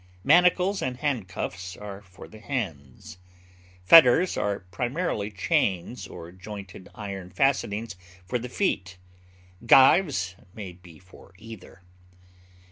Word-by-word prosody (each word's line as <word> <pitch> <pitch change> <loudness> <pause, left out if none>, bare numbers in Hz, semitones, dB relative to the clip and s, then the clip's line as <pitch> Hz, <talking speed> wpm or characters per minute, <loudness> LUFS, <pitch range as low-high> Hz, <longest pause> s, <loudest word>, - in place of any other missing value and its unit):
Manacles 180 +2 +4
and 125 -1 -3
handcuffs 95 -8 -4
are 100 -1 -9
for 90 -3 -14
the 110 - -14
hands, 90 - -6 0.6
fetters 165 - +7
are 100 -1 -2
primarily 120 - -2
chains 105 - -1
or 85 -1 -10
jointed 95 -1 -10
iron 100 -3 -7
fastenings 110 -1 -1 0.3
for 125 +6 -2
the 125 +2 -7
feet; 95 - -2 0.7
gyves 130 - +5 0.2
may 100 -4 -7
be 90 -2 -16
for 95 +2 -19
either. 110 -3 -13
105 Hz, 110 wpm, -26 LUFS, 90-130 Hz, 0.7 s, fetters